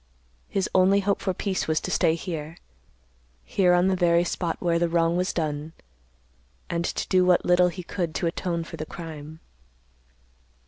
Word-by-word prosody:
His 195 -2 -1
only 190 +2 +4
hope 200 0 0
for 190 - 0
peace 190 +1 -2
was 155 -1 +1
to - - -4
stay 160 - +3
here; 165 -2 -6 0.9
here 180 - +3
on 175 +1 +3
the 190 - +2
very 175 -1 +3
spot 170 -1 -2
where 170 -1 +1
the 170 0 +1
wrong 165 0 +2
was 180 +2 0
done, 155 -1 -3 1.0
and 170 0 -1
to - - -3
do 185 -1 +3
what 180 -1 +3
little 180 0 +5
he 180 +1 -7
could 170 -2 -3
to - - -1
atone 170 0 -2
for 165 - -9
the 155 - -4
crime. 160 -1 -9
175 Hz, 175 wpm, -25 LUFS, 165-180 Hz, 1.0 s, little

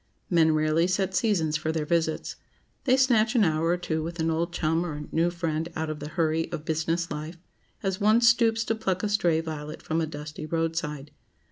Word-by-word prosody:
Men 160 -2 +4
rarely 155 +2 +2
set 185 0 0
seasons 175 -8 +1
for 155 +1 -2
their 160 -2 -2
visits. 160 0 -1 0.5
They 260 -1 +4
snatch 240 -3 +3
an 230 - +5
hour 160 -2 +1
or 175 +1 +2
two 160 -3 -2
with 170 +2 -6
an 160 0 +1
old 170 +2 -1
chum 165 0 0
or 150 -4 -5
new 165 +2 +2
friend 165 -2 -2
out 160 0 -2
of 150 - -6
the 150 - -6
hurry 160 -1 0
of 160 -3 -5
business 165 +2 -1
life, 155 +3 -5 0.5
as 190 +1 -2
one 215 +3 +5
stoops 230 -1 +4
to 225 - 0
pluck 190 -5 -2
a 210 - 0
stray 175 -6 +2
violet 155 -2 -6
from 160 +1 -1
a 160 - -1
dusty 150 0 -7
roadside. 160 -3 -2
165 Hz, 205 wpm, -27 LUFS, 155-185 Hz, 0.5 s, an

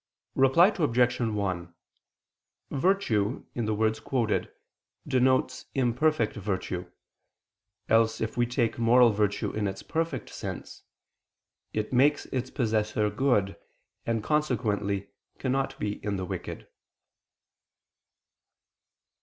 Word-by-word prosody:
Reply 135 +8 +5
Obj. 125 -6 +2
1: 100 -7 -2 1.0
Virtue, 135 - +1
in 120 - -2
the 110 0 0
words 110 +1 +1
quoted, 115 -1 -1 0.6
denotes 130 0 +1
imperfect 130 0 +2
virtue. 95 -3 -3 1.0
Else 115 0 +3
if 110 0 -3
we 120 0 +2
take 120 -1 0
moral 120 +1 +6
virtue 105 -1 0
in 105 -1 -1
its 95 0 -5
perfect 160 -6 -3
state, - - -7 0.9
"it 110 +3 -2
makes 140 +4 +3
its 130 0 -2
possessor 110 -3 0
good," 105 -5 +1 0.5
and 115 -2 -1
consequently 105 -9 0 0.3
cannot 135 +1 -1
be 105 0 -3
in 105 -1 -1
the 95 -1 -3
wicked. - - -6
115 Hz, 105 wpm, -28 LUFS, 105-130 Hz, 1.0 s, moral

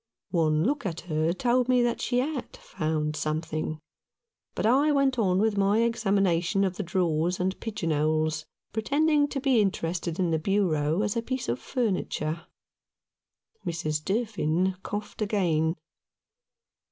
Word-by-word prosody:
One 155 -3 +2
look 280 +6 0
at 170 -5 -3
her 160 -1 0
told 245 +5 +1
me 250 -1 +4
that 240 -1 0
she 245 - 0
had 280 -2 -4
found 155 -3 -2
something; 155 0 -2 0.8
but - - -1
I 275 +7 +4
went 275 -3 +2
on 185 -4 +2
with 210 0 +2
my 205 +3 +3
examination 195 -5 +1
of 190 -2 0
the - - -1
drawers 175 -1 0
and 185 +1 -1
pigeon 205 -7 -3
holes, 155 +1 +1 0.3
pretending 290 +7 +2
to 285 - -3
be 260 -4 +3
interested 170 -3 -1
in 180 -3 +1
the 160 - +1
bureau 165 -2 +1
as 205 +1 -1
a 230 - +1
piece 260 +2 -3
of 120 - -1
furniture. 180 - -2 1.2
Mrs. 155 -2 -2
Durfin 190 -4 0
coughed 205 +2 -6
again. 170 -6 +1
190 Hz, 140 wpm, -27 LUFS, 160-230 Hz, 1.2 s, me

